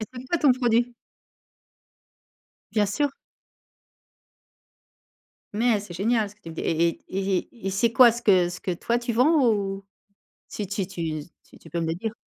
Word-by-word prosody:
Et 220 - -2
c’est 250 0 -8
quoi 345 +6 0
ton 285 -4 +5
produit? 240 -1 +1 1.8
Bien 210 -2 +2
sûr. 285 +9 0 2.5
Mais 230 0 +2
c'est 200 -4 -9
génial 220 +3 +1
ce 200 - -16
que 210 - -35
tu 165 - -9
me 160 - -10
dis. - - -4
Et 165 +1 +2
et 170 - -4
et 195 0 -1
et 235 -5 -12
et - - +1
c'est 215 +4 +1
quoi 255 -3 +8
ce 235 - -5
que 185 -5 +4
ce 180 - -7
que 185 - -2
toi 235 +7 -1
tu 240 0 -3
vends, 265 +2 +4
ou? 195 -1 -3 0.6
Si 210 - -5
tu 195 -1 -3
tu 165 -5 -4 0.3
tu - - -18
tu 165 - -16
peux 170 +2 -2
me 165 - -1
le - - -2
dire? 215 +5 -4
210 Hz, 190 wpm, -25 LUFS, 185-240 Hz, 2.5 s, quoi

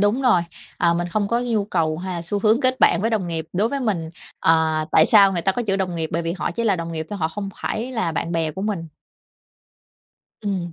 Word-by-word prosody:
Đúng 210 +6 +2
rồi, 225 -9 +4 0.4
à, 170 -1 +3
mình 175 +1 -2
không 205 +3 -1
có 235 +2 +1
nhu 230 -4 0
cầu 165 -5 -1
hay 185 0 -4
là 170 - -4
xu 205 +4 -2
hướng 220 +5 +3
kết 255 0 +2
bạn 170 - +5
với 225 +3 0
đồng 200 -6 -1
nghiệp. 165 -1 -3
Đối 205 +5 +1
với 280 +2 -2
mình, 190 -10 -1 0.3
ờ, 160 -1 +2
tại 160 - +6
sao 200 -3 +6
người 175 -2 -2
ta 195 - +2
có 245 - -2
chữ 195 -3 0
đồng 185 -2 -2
nghiệp 160 -1 -2
bởi 170 +1 0
vì 165 - -2
họ 180 - -3
chỉ 235 - -3
là 205 -4 +2
đồng 165 0 -5
nghiệp 160 -1 -4
thôi, 205 - -4
họ 160 -2 0
không 200 +4 -5
phải 240 +4 -3
là 200 -9 -1
bạn 165 +1 -2
bè 165 -2 0
của 190 +6 -6
mình. 195 -6 -3 1.5
Ừm. 190 -5 -3
190 Hz, 255 wpm, -22 LUFS, 165-215 Hz, 1.5 s, tại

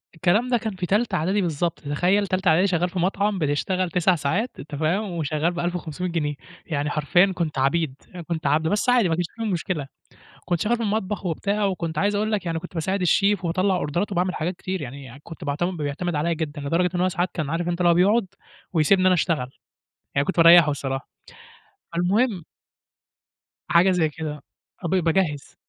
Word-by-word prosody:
الكلام 195 +9 +2
ده 245 - +3
كان 220 -4 -4
في 180 -1 -3
تالتة 210 +2 +1
إعدادي 185 +5 +1
بالضبط، 170 -1 -1
تتخيل 180 +8 +1
تالتة 185 0 +1
إعدادي 175 +5 +4
شغال 180 -1 +1
في 180 +1 -4
مطعم 200 +2 0
بتشتغل 175 +5 0
9 180 +2 +2
ساعات، 185 - -1
أنت 145 +1 -7
فاهم، 180 +7 0
وشغال 160 0 -1
ب1500 175 0 -3
جنيه، 150 -4 -1 0.3
يعني 145 -2 -2
حرفيًا 175 +6 +3
كنت 165 -5 -2
عبيد، 140 +1 +1 0.3
كنت 160 -3 -2
عبد 155 +3 +2
بس 205 +7 +1
عادي 245 -7 +4
ما 165 - +1
فيش 175 +1 -1
أي 225 - -2
مشكلة. 165 -4 -2 0.6
كنت 175 -2 -1
شغال 235 +5 +1
في 235 - -4
المطبخ 210 -2 -2
وبتاع 200 +5 -1
وكنت 170 -5 -2
عايز 205 +3 +1
أقول 215 +2 0
لك 200 -4 -1
يعني 165 -1 -1
كنت 180 +2 -10
باساعد 190 +4 -1
الشيف 195 +2 +2
وباطلع 185 +3 +1
أوردرات 175 +5 -2
وباعمل 180 -1 0
حاجات 175 +4 -2
كتير 185 +1 -4
يعني 135 0 -9
كنت 165 0 -10
باعتمد 175 +6 -1
بيعتمد 155 +3 -3
عليَّ 165 +3 0
جدًا، 155 -2 -4
لدرجة 165 +5 +1
إن 175 - 0
هو 185 - +3
ساعات 180 0 -1
كان 155 -5 -3
عارف 170 +2 -1
أنت 175 0 -2
اللي 175 -1 +4
هو - - +5
بيقعد 200 +5 +3 0.5
ويسيبني 185 +3 +3
أنا 185 - +5
أشتغل، 155 -7 0 0.6
يعني 140 - +2
كنت 190 - -2
باريحه 165 -2 +8
الصراحة. 135 -1 -4 0.8
فالمهم 190 +4 +1 1.3
حاجة 180 +3 +5
زي 165 -4 +2
كده. 150 -2 -6 0.4
آه، - - -1
ب 190 - 0
باجهز. 165 -4 0
175 Hz, 190 wpm, -24 LUFS, 155-190 Hz, 1.3 s, باريحه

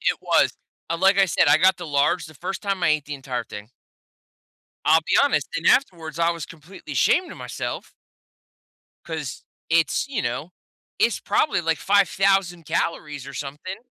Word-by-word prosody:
it - - +1
was. - - +3 0.4
Like 195 +3 +3
I 195 - +5
said, 155 - +3
I 145 - +6
got 185 +3 +4
the 175 -2 -8
large, 150 +4 +1
the 155 - -14
1st 185 +9 -5
time 195 -2 -2
I - - +3
ate 155 -2 +1
the 150 - -6
entire 130 -3 -4
thing. 105 -1 -10 1.2
I'll 160 +1 +5
be 160 - 0
honest, 250 - +1
and 165 - -3
afterwards, 170 - +1
I 170 0 +3
was 170 -3 -5
completely 165 +4 -11
ashamed 365 - +2
of - - -12
myself - - -6 1.1
'cause 160 -4 -6 0.3
it's, 165 - +2
you 275 -5 -2
know, 135 +8 -4 0.5
it's - - +2
probably, 300 - +1
like, 165 -2 0
5,000 195 -3 +2
calories 150 -3 -3
or 140 - -9
something. 145 +8 -6
165 Hz, 170 wpm, -23 LUFS, 145-190 Hz, 1.2 s, I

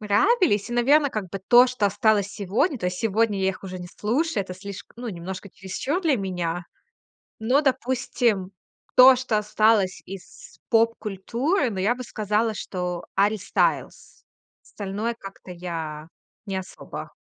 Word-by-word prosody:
нравились, 215 - +3
и, - - -3
наверно, 275 +4 +4
как 205 -4 -4
бы 195 - -4
то, 245 +1 +8
что 250 -5 +1
осталось 205 0 +2
сегодня, 215 - 0
то 180 - -2
есть 180 0 -3
сегодня 220 -2 +1
я 190 - +2
их 185 0 -10
уже 185 -1 -6
не 175 0 -8
слушаю- 240 - -1
это 185 - -7
слишк 200 +1 -9
ну, 240 0 -6
немножко 185 +1 -6
чересчур 225 - -3
для 305 -6 +3
меня. 180 -3 -3 0.8
Но, 255 +6 +3
допустим, 245 -6 0 0.5
то, 255 0 +9
что 245 -4 0
осталось 210 -2 +2
из 190 -1 -11
поп-культуры, 230 - +1
ну, 190 - -5
я 210 +6 +2
бы 255 - -7
сказала, 215 +1 0
что 180 -3 -4
Гарри 205 +2 +3
Стайлс. 200 - -1 0.4
Остальное 210 +3 -4
как-то 195 -1 -11
я 160 -3 -6 0.4
не 195 -1 -3
особо. 190 0 -7
210 Hz, 150 wpm, -24 LUFS, 190-240 Hz, 0.8 s, то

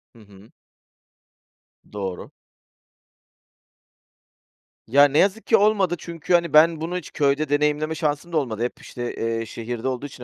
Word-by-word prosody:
Hı - - -17
hı. 100 +1 -18 1.4
Doğru. 95 -3 -5 2.6
Ya, 140 +5 +5
ne 145 +1 0
yazık 200 +3 +1
ki 225 - +5
olmadı 200 -4 +2
çünkü, 170 +1 -4
hani, 170 -3 +2
ben 160 +1 +5
bunu 175 +3 -3
hiç 180 - -8
köyde 140 +1 0
deneyimleme 150 +2 0
şansım 155 +1 -2
da - - +2
olmadı. 120 -6 -2
Hep 125 - -4
işte, 120 -1 -6
eee, 115 0 -2
şehirde 115 +2 -5
olduğu 130 +1 -3
için 130 -3 -10
145 Hz, 140 wpm, -23 LUFS, 120-170 Hz, 2.6 s, Ya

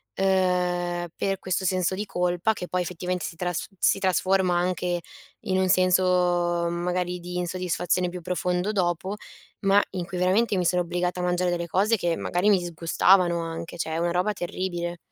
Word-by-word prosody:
ehm, 180 -2 +1
per 195 -1 -1
questo 185 0 -2
senso 185 0 +1
di 205 +3 -3
colpa, 180 +2 0
che 180 - -6
poi 180 0 -1
effettivamente 180 +1 -3
si 165 - -6
trasf 180 -1 -2
si - - +3
trasforma 185 -1 +2
anche 180 0 0 0.4
in 185 - -1
un 190 0 +1
senso, 185 0 +4 0.7
mhmm, - - -3
magari 180 0 -1
di 180 +1 -6
insoddisfazione 180 0 -1
più 180 +1 -6
profondo 180 +2 -1
dopo, 185 0 -1 0.5
ma 200 +1 +5
in 180 -2 -4
cui 180 +1 -6
veramente 195 +4 +2
mi 180 - 0
sono 180 +1 +2
obbligata 180 +1 -2
a - - -3
mangiare 180 0 +1
delle 170 -1 -2
cose 200 +7 +2
che 175 -3 0
magari 180 +4 +1
mi 205 - +6
disgustavano 175 +1 +2
anche, 165 0 -6
cioè 160 -1 -2
una 170 +1 0
roba 180 +4 +1
terribile. 175 -2 -4
180 Hz, 175 wpm, -25 LUFS, 175-185 Hz, 0.7 s, mi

